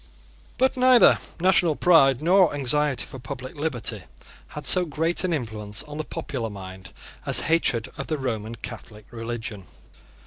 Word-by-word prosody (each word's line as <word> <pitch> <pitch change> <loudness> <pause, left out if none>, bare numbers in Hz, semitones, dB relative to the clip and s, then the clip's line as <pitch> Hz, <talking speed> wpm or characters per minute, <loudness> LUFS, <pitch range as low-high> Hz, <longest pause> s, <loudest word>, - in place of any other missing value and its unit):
But 260 +1 +2
neither 255 -1 +5 0.2
national 175 -3 +3
pride 140 -6 +4
nor 180 -2 +4
anxiety 145 0 0
for 130 - -10
public 130 0 -8
liberty 145 -6 -2 0.5
had 150 -1 -8
so 180 - +5
great 165 +2 -1
an 185 - -1
influence 110 -8 -4
on 150 0 -9
the - - -1
popular 120 -6 -5
mind 95 -3 -10 0.3
as - - +4
hatred 145 -8 +1
of - - -5
the 155 - -2
Roman 115 -4 -4
Catholic 110 -2 -10
religion. 115 -4 -6
135 Hz, 145 wpm, -24 LUFS, 115-165 Hz, 0.5 s, neither